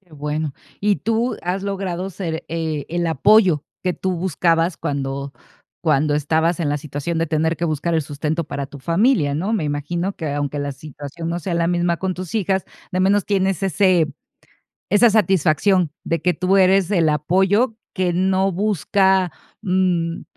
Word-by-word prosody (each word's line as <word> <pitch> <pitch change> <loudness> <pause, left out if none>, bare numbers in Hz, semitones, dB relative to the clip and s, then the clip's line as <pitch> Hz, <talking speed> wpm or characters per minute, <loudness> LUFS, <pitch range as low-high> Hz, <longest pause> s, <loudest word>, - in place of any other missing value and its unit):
Qué 180 -5 -27
bueno. 150 0 -3 0.3
Y 205 -1 +2
tú 230 +2 -1
has 185 +2 -2
logrado 195 -2 -3
ser, 165 -3 -4
eh, 160 -3 -3
el 170 +1 -1
apoyo 175 - +4 0.2
que 180 -1 0
tú 185 +1 -2
buscabas 170 0 +1
cuando 140 -1 -3 0.5
cuando 150 -2 +2
estabas 160 +4 +1
en 160 -4 -1
la 145 - 0
situación 150 +3 -4
de 165 - +1
tener 160 +1 0
que 170 - -2
buscar 165 +1 -1
el 160 - +2
sustento 150 +3 -2
para 140 -2 -5
familia, 170 - +2
¿no? 185 +9 -1
Me 210 -7 0
imagino 160 +6 -2
que, 155 -3 -3
aunque 145 0 -2
la 145 0 -2
situación 150 +3 -8
no 170 +1 -2
sea 175 0 -3
la 170 0 +1
misma 175 -1 +1
con 190 -1 -2
tus 185 0 -7
hijas, 195 -3 0 0.3
de 185 - -2
menos 200 +2 +3
tienes 195 -2 0
ese 185 -5 +2 0.8
esa 225 +4 +5
satisfacción 185 -3 +3
de 165 - -1
que 180 - +3
tú 185 +4 +1
eres 190 0 +4
el 170 -6 +3
apoyo 190 - +2 0.2
que 185 -3 0
no 190 +2 +2
busca, 190 -1 +2 0.3
mm, 180 -3 0
175 Hz, 170 wpm, -21 LUFS, 155-190 Hz, 0.8 s, esa